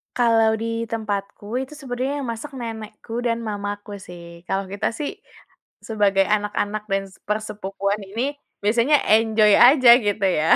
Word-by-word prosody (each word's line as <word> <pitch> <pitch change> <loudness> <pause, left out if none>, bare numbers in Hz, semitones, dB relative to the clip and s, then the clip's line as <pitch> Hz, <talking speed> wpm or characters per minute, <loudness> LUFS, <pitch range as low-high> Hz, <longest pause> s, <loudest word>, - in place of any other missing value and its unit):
Kalau 225 -2 +3
di 230 +1 -3
tempatku 215 +1 -4
itu 265 +3 -6
sebenarnya 270 0 -3
yang - - -5
masak 230 +6 -7
nenekku 225 -1 -6
dan 235 -1 -1
mamaku 205 -1 -5
sih 170 -1 -12
kalau 195 +1 -1
kita 200 - -1
sih, 300 - -5 0.6
sebagai 200 -3 +2
anak-anak 210 0 -1
dan 195 0 +1
se - - -20
persepupuan 210 -1 -2
ini 230 +8 -2 0.3
biasanya 235 +8 +3 0.2
enjoy 220 -1 +4
aja 255 -1 +7 0.2
gitu 205 0 0
ya 160 -4 +3
215 Hz, 140 wpm, -22 LUFS, 205-235 Hz, 0.6 s, aja